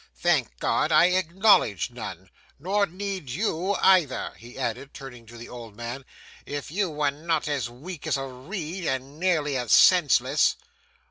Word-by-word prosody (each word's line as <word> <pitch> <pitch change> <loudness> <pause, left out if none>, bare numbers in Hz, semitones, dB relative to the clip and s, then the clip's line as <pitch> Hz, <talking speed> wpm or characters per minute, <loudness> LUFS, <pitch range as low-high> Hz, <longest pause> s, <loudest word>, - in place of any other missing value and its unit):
Thank - - +1
God - - 0
I 175 - +6
acknowledge 180 - +2
none! 95 -6 -8 0.3
Nor 200 +7 0
need 190 -4 -5
you 185 - -1
either,' 180 -11 +2
he 120 +2 -14
added, 135 +4 -4
turning 125 -4 -10
to 120 +1 -12
the 115 - -9
old 115 -4 -10
man, 120 +4 -6 0.4
'if 145 0 -6
you 190 +1 0
were 150 -2 0
not 160 +2 -2
as 140 -5 -2
weak 150 +6 -9
as 145 -4 +1
a 135 - -4
reed, 160 +7 -6
and 135 +2 -3
nearly 160 -6 +1
as 125 -3 -3
senseless. 145 -5 +5
145 Hz, 155 wpm, -25 LUFS, 125-180 Hz, 0.4 s, I